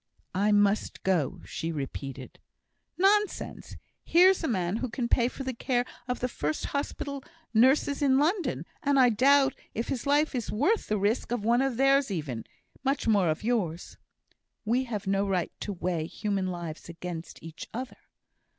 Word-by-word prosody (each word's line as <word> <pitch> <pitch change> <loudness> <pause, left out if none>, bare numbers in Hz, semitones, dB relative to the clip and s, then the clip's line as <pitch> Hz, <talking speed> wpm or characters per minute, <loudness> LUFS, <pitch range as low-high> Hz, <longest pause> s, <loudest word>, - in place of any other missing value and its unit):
"I 200 +3 +2
must 205 0 +2
go," 175 -8 0
she 165 - -4
repeated. 135 -3 -6 0.6
"Nonsense! 415 +2 +1 0.3
Here's 365 +2 +5
a - - +1
man 185 -3 0
who 255 - -3
can 235 +1 -2
pay 235 0 +3
for 270 - -6
the 260 -1 -3
care 245 +1 0 0.2
of 250 - -2
the 250 - +1
first 155 -10 -3
hospital 280 -1 -3 0.3
nurses 270 +5 +4
in 265 -2 +4
London 295 - 0 0.2
and 280 -1 +2
I 250 -1 +7
doubt 270 +4 +4 0.2
if 230 - -2
his 265 +1 -3
life 295 +2 +3
is 245 -4 -3
worth 325 - +1
the 210 - +1
risk 205 +4 0
of 240 -4 -1
one 240 +2 +4
of 270 -3 0
theirs 275 0 +4
even, 145 - -4 0.4
much 275 -1 0
more 200 -6 +4
of 155 +4 -2
yours." 195 -8 -2 0.7
"We 245 +4 +1
have 215 -5 -4
no 195 +1 +1
right 185 -3 0
to 205 - -4
weigh 175 -4 -2
human 200 0 -2
lives 170 -3 -6
against 170 0 -7
each 165 0 -8
other." 255 +3 -6
230 Hz, 170 wpm, -28 LUFS, 180-270 Hz, 0.7 s, I